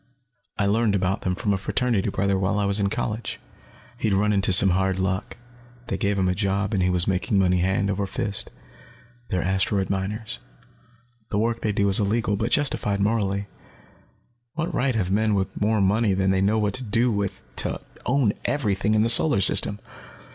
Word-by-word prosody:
I 100 Hz, -, +1 dB
learned 105 Hz, +1 st, +2 dB
about 95 Hz, 0 st, -1 dB
them 90 Hz, -1 st, -1 dB
from 100 Hz, +2 st, -1 dB
a 95 Hz, -, -1 dB
fraternity 115 Hz, 0 st, 0 dB
brother 100 Hz, +1 st, 0 dB
while 95 Hz, +2 st, 0 dB
I 105 Hz, -, 0 dB
was 100 Hz, +1 st, +2 dB
in 100 Hz, -1 st, +1 dB
college. 110 Hz, +2 st, -4 dB, 0.6 s
He'd 110 Hz, -4 st, 0 dB
run 105 Hz, +2 st, +2 dB
into 100 Hz, -1 st, +1 dB
some 95 Hz, +1 st, +6 dB
hard 95 Hz, +1 st, 0 dB
luck, 95 Hz, 0 st, -2 dB, 0.5 s
they 100 Hz, -, -1 dB
gave 100 Hz, 0 st, 0 dB
him 95 Hz, -1 st, +1 dB
a 90 Hz, -, +1 dB
job, 100 Hz, +1 st, -1 dB
and 95 Hz, -, +1 dB
he 90 Hz, -, +2 dB
was 90 Hz, -1 st, +3 dB
making 95 Hz, +1 st, 0 dB
money 90 Hz, -2 st, +2 dB
hand 95 Hz, +2 st, 0 dB
over 100 Hz, 0 st, -2 dB
fist. 100 Hz, +1 st, -3 dB, 0.8 s
They're 90 Hz, -2 st, -1 dB
asteroid 95 Hz, +2 st, 0 dB
miners. 105 Hz, +3 st, -4 dB, 0.9 s
The 100 Hz, -, -2 dB
work 115 Hz, +2 st, 0 dB
they 110 Hz, -, -1 dB
do 100 Hz, 0 st, +1 dB
is 95 Hz, -, +5 dB
illegal, 105 Hz, +1 st, 0 dB
but 110 Hz, -, -2 dB
it's 120 Hz, -, +3 dB
perfectly 145 Hz, -, +2 dB, 0.2 s
justified 100 Hz, -1 st, -2 dB
morally. 100 Hz, -1 st, 0 dB, 1.1 s
What 165 Hz, +1 st, -3 dB
right 130 Hz, -1 st, 0 dB
have 95 Hz, -4 st, -1 dB
men 110 Hz, +1 st, +1 dB
with 95 Hz, 0 st, -3 dB
more 105 Hz, 0 st, +2 dB
money 100 Hz, +1 st, +2 dB
than 95 Hz, 0 st, +1 dB
they 95 Hz, 0 st, +1 dB
know 105 Hz, +3 st, +2 dB
what 105 Hz, -2 st, 0 dB
to 130 Hz, -, -4 dB
do 115 Hz, +2 st, +1 dB
with 100 Hz, -2 st, -3 dB
to -, -, -2 dB, 0.2 s
own 125 Hz, -4 st, +1 dB
everything 105 Hz, -5 st, 0 dB
in 110 Hz, -, +3 dB
the -, -, +2 dB
Solar 120 Hz, 0 st, +5 dB
System? 100 Hz, +1 st, +2 dB
100 Hz, 200 wpm, -24 LUFS, 95-110 Hz, 1.1 s, some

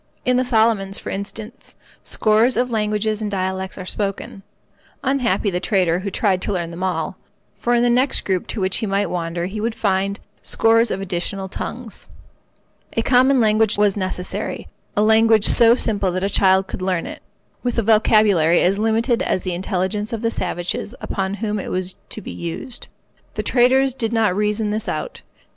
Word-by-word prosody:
In 250 Hz, -, +3 dB
the 255 Hz, -, +2 dB
Solomons, 220 Hz, -5 st, +2 dB
for -, -, -6 dB
instance, 215 Hz, +5 st, -7 dB, 0.3 s
scores 220 Hz, +3 st, +2 dB
of 250 Hz, 0 st, 0 dB
languages 215 Hz, 0 st, -1 dB
and 210 Hz, -, -2 dB
dialects 190 Hz, -1 st, -3 dB
are 185 Hz, -, -6 dB
spoken. 195 Hz, 0 st, -3 dB, 0.6 s
Unhappy 235 Hz, -7 st, +1 dB
the 180 Hz, -, -1 dB
trader 180 Hz, -3 st, +1 dB
who 200 Hz, +2 st, -4 dB
tried 190 Hz, -1 st, 0 dB
to -, -, -2 dB
learn 170 Hz, -3 st, -2 dB
them 170 Hz, +2 st, -8 dB
all; 185 Hz, -1 st, -2 dB, 0.4 s
for 240 Hz, 0 st, +1 dB
in 240 Hz, -, +3 dB
the 245 Hz, -, +3 dB
next 255 Hz, +3 st, +2 dB
group 185 Hz, -2 st, -1 dB
to -, -, -4 dB
which 190 Hz, 0 st, 0 dB
he 220 Hz, -, -2 dB
might 200 Hz, -1 st, 0 dB
wander 170 Hz, 0 st, -2 dB
he 205 Hz, +3 st, -5 dB
would 225 Hz, +1 st, -2 dB
find 195 Hz, -1 st, 0 dB, 0.2 s
scores 230 Hz, +1 st, +3 dB
of 195 Hz, -, -3 dB
additional 190 Hz, +1 st, -3 dB
tongues. 230 Hz, +4 st, -7 dB, 0.9 s
A 230 Hz, -, 0 dB
common 260 Hz, +2 st, +4 dB
language 220 Hz, -1 st, +3 dB
was 205 Hz, -1 st, +3 dB
necessary—a 185 Hz, +1 st, -4 dB
language 220 Hz, 0 st, +4 dB
so 235 Hz, 0 st, +6 dB
simple 205 Hz, -6 st, +1 dB
that 185 Hz, +1 st, -2 dB
a 200 Hz, -, +1 dB
child 190 Hz, 0 st, +3 dB
could 190 Hz, -, -7 dB
learn 185 Hz, -2 st, -1 dB
it, -, -, -8 dB, 0.4 s
with 245 Hz, -1 st, -2 dB
a 230 Hz, -, +2 dB
vocabulary 210 Hz, -6 st, +4 dB
as 195 Hz, +3 st, +2 dB
limited 225 Hz, +2 st, +1 dB
as 185 Hz, -, -1 dB
the 185 Hz, -, -2 dB
intelligence 190 Hz, +3 st, -2 dB
of 230 Hz, -1 st, -4 dB
the 230 Hz, -, +1 dB
savages 180 Hz, +4 st, -3 dB
upon 195 Hz, 0 st, -3 dB
whom 210 Hz, 0 st, -2 dB
it -, -, -6 dB
was 185 Hz, 0 st, -3 dB
to 215 Hz, -, -5 dB
be -, -, -8 dB
used. 170 Hz, +8 st, -6 dB, 0.5 s
The -, -, -2 dB
traders 260 Hz, +1 st, +3 dB
did 235 Hz, -3 st, -2 dB
not 220 Hz, -5 st, +2 dB
reason 210 Hz, +1 st, 0 dB
this 215 Hz, +1 st, -2 dB
out. -, -, -4 dB
210 Hz, 180 wpm, -20 LUFS, 190-225 Hz, 0.9 s, so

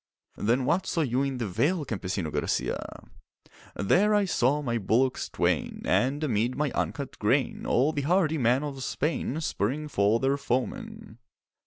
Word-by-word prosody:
'Then 120 Hz, +4 st, +1 dB
what 170 Hz, +7 st, +1 dB
saw 165 Hz, -, 0 dB
you 130 Hz, -3 st, +1 dB
in 135 Hz, -2 st, -1 dB
the 120 Hz, -3 st, -2 dB
vale, 150 Hz, -, 0 dB
Campesino 95 Hz, -, -3 dB
Garcia?' -, -, -2 dB, 0.7 s
'There 205 Hz, -, +3 dB
I 205 Hz, -1 st, +3 dB
saw 145 Hz, -4 st, +1 dB
my 120 Hz, -3 st, -1 dB
bullocks 125 Hz, +6 st, +1 dB
twain, -, -, -1 dB
And 140 Hz, +5 st, +1 dB
amid 120 Hz, -2 st, 0 dB
my 150 Hz, -2 st, 0 dB
uncut 140 Hz, -2 st, -3 dB
grain 125 Hz, +5 st, 0 dB
All 140 Hz, +6 st, +2 dB
the 145 Hz, -, -1 dB
hardy 160 Hz, 0 st, +2 dB
men 125 Hz, +3 st, +2 dB
of 135 Hz, -3 st, -5 dB
Spain 150 Hz, +1 st, -2 dB
Spurring 150 Hz, +2 st, -1 dB
for 105 Hz, -4 st, +2 dB
their 135 Hz, +2 st, +1 dB
foemen. 215 Hz, -, -4 dB
135 Hz, 155 wpm, -27 LUFS, 120-155 Hz, 0.7 s, There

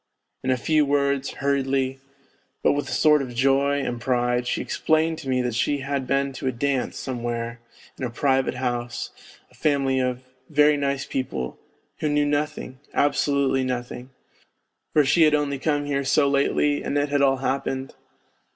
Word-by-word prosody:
In 130 Hz, -, -2 dB
a 130 Hz, -, +3 dB
few 155 Hz, +4 st, +2 dB
words, 140 Hz, -1 st, +1 dB
hurriedly, 135 Hz, -1 st, 0 dB, 0.6 s
but -, -, +5 dB
with 145 Hz, 0 st, -2 dB
a -, -, -5 dB
sort 150 Hz, -2 st, +4 dB
of 125 Hz, -3 st, -6 dB
joy 140 Hz, +3 st, +2 dB
and 120 Hz, -1 st, -3 dB
pride, 125 Hz, 0 st, 0 dB
she -, -, 0 dB
explained 160 Hz, +1 st, 0 dB
to 135 Hz, -4 st, -7 dB
me 125 Hz, -1 st, +1 dB
that 125 Hz, -2 st, -2 dB
she 140 Hz, +4 st, 0 dB
had 135 Hz, -1 st, -2 dB
been 140 Hz, 0 st, 0 dB
to 135 Hz, -, -5 dB
a -, -, +2 dB
dance 130 Hz, +1 st, -1 dB
somewhere 120 Hz, -2 st, -4 dB, 0.4 s
in -, -, -5 dB
a 125 Hz, -, -1 dB
private 130 Hz, +1 st, +1 dB
house, 120 Hz, -1 st, -3 dB, 0.4 s
a -, -, -22 dB
family 135 Hz, -3 st, +1 dB
of 125 Hz, 0 st, -1 dB, 0.2 s
" -, -, -40 dB
very 150 Hz, 0 st, +4 dB
nice 140 Hz, -1 st, -1 dB
people, 65 Hz, -, -4 dB, 0.4 s
wlio 150 Hz, -, +1 dB
knew 145 Hz, 0 st, +2 dB
nothing, 145 Hz, -3 st, -2 dB, 0.2 s
absolutely 140 Hz, -2 st, +2 dB
nothing, 125 Hz, 0 st, -4 dB, 0.8 s
for 150 Hz, -2 st, +4 dB
she 150 Hz, +5 st, +3 dB
had 155 Hz, -1 st, +6 dB
only 140 Hz, -2 st, -1 dB
come 145 Hz, 0 st, 0 dB
here 140 Hz, -1 st, -1 dB
so 140 Hz, +2 st, +3 dB
lately 140 Hz, +1 st, +2 dB
and 145 Hz, -, -1 dB
it 145 Hz, 0 st, +1 dB
had 145 Hz, 0 st, +1 dB
all 135 Hz, -1 st, +4 dB
happened 135 Hz, 0 st, -2 dB
135 Hz, 175 wpm, -24 LUFS, 130-145 Hz, 0.8 s, had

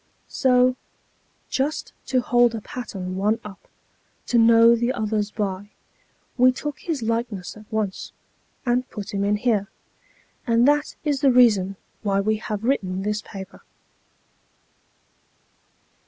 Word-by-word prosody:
So, 250 Hz, -1 st, +3 dB, 0.7 s
just 285 Hz, +3 st, -2 dB
to 255 Hz, -1 st, +2 dB
hold 240 Hz, -1 st, +3 dB
a 220 Hz, -, -5 dB
pattern 190 Hz, -6 st, -6 dB
one 210 Hz, +4 st, +1 dB
up, 200 Hz, -2 st, -11 dB, 0.6 s
to 240 Hz, -, +2 dB
know 230 Hz, +1 st, +6 dB
the 240 Hz, +2 st, 0 dB
others 215 Hz, -3 st, -1 dB
by, 205 Hz, -1 st, -4 dB, 0.7 s
we 255 Hz, +1 st, +7 dB
took 295 Hz, +3 st, -5 dB
his 310 Hz, -8 st, -3 dB
likeness 225 Hz, -4 st, -3 dB
at 215 Hz, +1 st, -15 dB
once, 215 Hz, -3 st, -3 dB, 0.5 s
and 250 Hz, +1 st, 0 dB
put 205 Hz, -1 st, -7 dB
him 200 Hz, 0 st, -1 dB
in 205 Hz, +1 st, +2 dB
here. 210 Hz, -2 st, 0 dB, 0.8 s
And 235 Hz, +2 st, +4 dB
that 295 Hz, +1 st, +2 dB
is 290 Hz, -3 st, 0 dB
the 275 Hz, -3 st, +5 dB
reason 210 Hz, -6 st, +4 dB, 0.3 s
why 200 Hz, -2 st, +1 dB
we 215 Hz, +2 st, +1 dB
have 210 Hz, -1 st, -5 dB
written 195 Hz, -7 st, -1 dB
this 210 Hz, +1 st, -1 dB
paper. 195 Hz, -2 st, -10 dB
225 Hz, 130 wpm, -23 LUFS, 205-250 Hz, 0.8 s, we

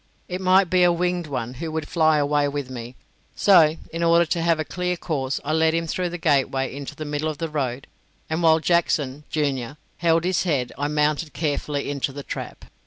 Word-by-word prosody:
It 180 Hz, +1 st, -4 dB
might 185 Hz, +1 st, +4 dB
be 185 Hz, +1 st, +2 dB
a 175 Hz, 0 st, +6 dB
winged 175 Hz, 0 st, -1 dB
one 125 Hz, -4 st, -4 dB
who 165 Hz, -1 st, -3 dB
would 160 Hz, -1 st, -3 dB
fly 160 Hz, -2 st, +3 dB
away 145 Hz, 0 st, +2 dB
with 140 Hz, -2 st, -4 dB
me; 120 Hz, 0 st, -7 dB, 0.4 s
so, 165 Hz, -5 st, +5 dB, 0.2 s
in 165 Hz, -, -3 dB
order 170 Hz, 0 st, +4 dB
to 170 Hz, +1 st, -1 dB
have 165 Hz, -1 st, +2 dB
a 155 Hz, -, -1 dB
clear 180 Hz, -1 st, -2 dB
course, 140 Hz, -6 st, -2 dB
I 155 Hz, -, 0 dB
led 160 Hz, 0 st, +3 dB
him 165 Hz, 0 st, 0 dB
through 180 Hz, +2 st, -2 dB
the 175 Hz, -, -5 dB
gateway 135 Hz, -4 st, +1 dB
into 140 Hz, +1 st, -7 dB
the 155 Hz, -, -6 dB
middle 150 Hz, +1 st, -2 dB
of 155 Hz, -, -5 dB
the 165 Hz, +1 st, -3 dB
road, 135 Hz, -4 st, -3 dB, 0.4 s
and 160 Hz, +2 st, -2 dB
while 160 Hz, -1 st, +5 dB
Jackson, 150 Hz, -4 st, 0 dB
junior, 140 Hz, -3 st, -2 dB, 0.2 s
held 165 Hz, -1 st, +2 dB
his 180 Hz, 0 st, +1 dB
head, 140 Hz, -9 st, 0 dB
I 145 Hz, -, -2 dB
mounted 150 Hz, +1 st, 0 dB
carefully 145 Hz, -2 st, -2 dB
into 140 Hz, -1 st, -2 dB
the 140 Hz, +1 st, -8 dB
trap. -, -, -7 dB
155 Hz, 210 wpm, -23 LUFS, 145-170 Hz, 0.4 s, a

